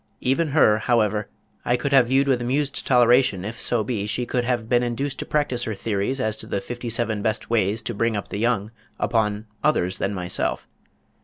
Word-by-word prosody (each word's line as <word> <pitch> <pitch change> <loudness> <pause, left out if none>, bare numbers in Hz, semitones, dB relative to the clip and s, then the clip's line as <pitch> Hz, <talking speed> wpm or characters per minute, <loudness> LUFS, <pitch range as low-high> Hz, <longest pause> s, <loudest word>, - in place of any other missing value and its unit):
Even 135 +6 +1
her, 135 -8 +4
however, 110 -2 +1 0.3
I 120 - +1
could 140 +1 -2
have 130 -3 +6
viewed 135 +2 +2
with 130 -3 +2
amused 135 +3 -1
toleration 120 -6 +4
if 115 +3 -6
so 120 -3 0
be 105 -2 -3
she 120 +4 -1
could 125 0 -1
have 120 -3 -1
been 120 +1 +3
induced 125 +3 -2
to - - -5
practice 145 -5 0
her 110 - -3
theories 105 +6 -2
as 110 -4 0
to 110 - -4
the 100 - -1
Fifty 120 +4 -6
seven 115 -2 0
Best 110 +1 -2
Ways 110 -1 +1
To 120 - -4
Bring 115 0 0
Up 100 - -5
The 100 - -4
Young 110 -2 0 0.3
upon 105 -2 0 0.2
others 95 -12 +1
than 100 +1 -1
myself. 90 -1 -2
115 Hz, 205 wpm, -23 LUFS, 105-125 Hz, 0.3 s, have